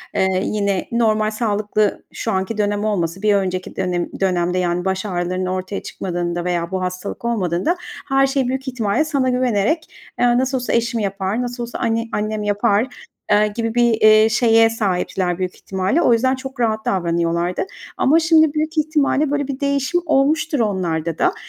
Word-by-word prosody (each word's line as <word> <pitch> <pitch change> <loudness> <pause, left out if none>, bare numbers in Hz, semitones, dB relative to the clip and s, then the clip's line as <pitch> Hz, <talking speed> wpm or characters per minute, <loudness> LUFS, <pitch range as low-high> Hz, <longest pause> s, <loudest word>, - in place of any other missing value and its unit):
eee, 190 -1 +1
yine 200 -3 -1
normal 215 -2 +2
sağlıklı 215 -1 0
şu - - -3
anki 190 +3 -2
dönem 205 0 0
olmasın, 185 -3 -1
bir 210 -1 +4
önceki 185 -2 -2
dönem 180 -2 -1
dönemde, 180 -2 +1
yani, 180 0 0
baş 190 +1 -1
ağrılarının 185 -1 -2
ortaya 185 +2 -3
çıkmadığında 175 -1 -3
veya 175 -1 -1
bu 185 -1 -2
hastalık 185 +5 -5
olmadığında 215 - 0 0.3
her 270 0 +4
şey 270 -2 0
büyük 265 +1 -3
ihtimalle 240 +3 0
sana 275 -4 0
güvenerek, 250 - +1 0.3
eee, 245 0 +4
"Nasıl 260 +1 +1
olsa 250 - -2
eşim 235 0 +1
yapar, 195 +2 -2
nasıl 245 0 -4
olsa 235 - -6
anne 230 0 0
annem 215 0 -2
yapar," 205 +3 +1 0.4
eee, 210 +1 +5
gibi 230 -1 -2
bir, 240 -1 +4
eee, 215 0 +6
şeye 225 0 +4
sahipler 185 -4 -1
büyük 185 -1 -3
ihtimalle. 190 - -1
O 245 - +4
yüzden 260 +3 +2
çok 265 0 -9
rahat 220 -2 0
davranıyorlardı 170 - 0 0.3
ama 310 +5 +4
şimdi 320 -2 +4
büyük 310 +1 -2
ihtimalle, 300 -1 +1
böyle, 285 -2 -1
bir 275 -1 -4
değişim 280 +5 0
olmuştur 300 0 +2
onlarda 170 -7 -1
da. 365 - +2
215 Hz, 170 wpm, -20 LUFS, 185-255 Hz, 0.4 s, eee